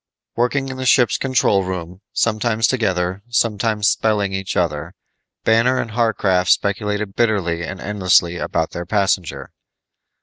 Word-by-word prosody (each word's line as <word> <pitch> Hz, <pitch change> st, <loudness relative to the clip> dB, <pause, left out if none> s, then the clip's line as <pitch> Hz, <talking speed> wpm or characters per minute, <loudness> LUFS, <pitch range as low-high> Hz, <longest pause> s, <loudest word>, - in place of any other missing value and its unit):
Working 135 Hz, +3 st, 0 dB
in 130 Hz, -, -6 dB
the 130 Hz, -, -4 dB
ship's 120 Hz, -3 st, +4 dB
control 120 Hz, -7 st, +2 dB
room, 90 Hz, 0 st, -6 dB
sometimes 115 Hz, 0 st, +1 dB
together, 95 Hz, -6 st, 0 dB
sometimes 110 Hz, -2 st, +1 dB
spelling 105 Hz, -3 st, +1 dB
each 95 Hz, 0 st, -3 dB
other, 85 Hz, +1 st, -2 dB, 0.5 s
Banner 115 Hz, +3 st, +3 dB
and 115 Hz, -3 st, -4 dB
Warcraft 100 Hz, -6 st, +1 dB
speculated 105 Hz, 0 st, 0 dB
bitterly 95 Hz, -8 st, 0 dB
and 95 Hz, +2 st, -6 dB
endlessly 90 Hz, -4 st, +2 dB
about 80 Hz, -1 st, -2 dB
their 85 Hz, 0 st, -6 dB
passenger. 95 Hz, -4 st, -1 dB
100 Hz, 130 wpm, -19 LUFS, 90-115 Hz, 0.5 s, ship's